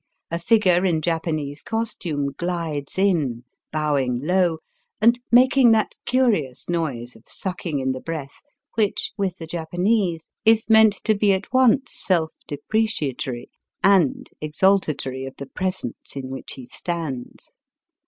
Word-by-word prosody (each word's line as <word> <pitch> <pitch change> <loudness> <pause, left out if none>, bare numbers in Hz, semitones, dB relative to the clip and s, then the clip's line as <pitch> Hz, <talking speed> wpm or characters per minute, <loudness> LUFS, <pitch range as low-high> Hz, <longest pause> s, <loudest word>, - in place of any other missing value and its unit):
A 170 - -1
figure 185 -2 +3
in 175 -4 +2
Japanese 155 -3 -2
cos 225 0 -2
tume 145 -4 -3
gUdes 165 -5 -3
in, 155 -12 +1 0.3
bowing 140 -5 0
low 180 -1 +2 0.4
and 235 +3 +4
making 250 0 +6
that 220 -1 +1
curious 210 - +1
noise 140 -9 -2
of 110 - -18
sucking 180 -5 -4
in 130 -1 0
the 130 - -4
breath 150 -2 -6 0.3
which 215 -3 0
with 195 -3 -2
the 165 - -7
Japanese 175 +2 -1
is 225 0 +4
meant 220 -1 +6
to 220 - +3
be 200 -1 +3
at 190 +5 -4
once 255 0 +4
self 165 -4 0
depreciatory 145 - -2 0.3
and 190 -8 +3
exaltatory 150 -5 +1
of 135 - -9
the 140 - -6
presence 185 -5 -4
in 130 -1 -5
which 135 - -6
he 130 - -9
stands. 155 -6 -5
170 Hz, 135 wpm, -23 LUFS, 140-200 Hz, 0.4 s, making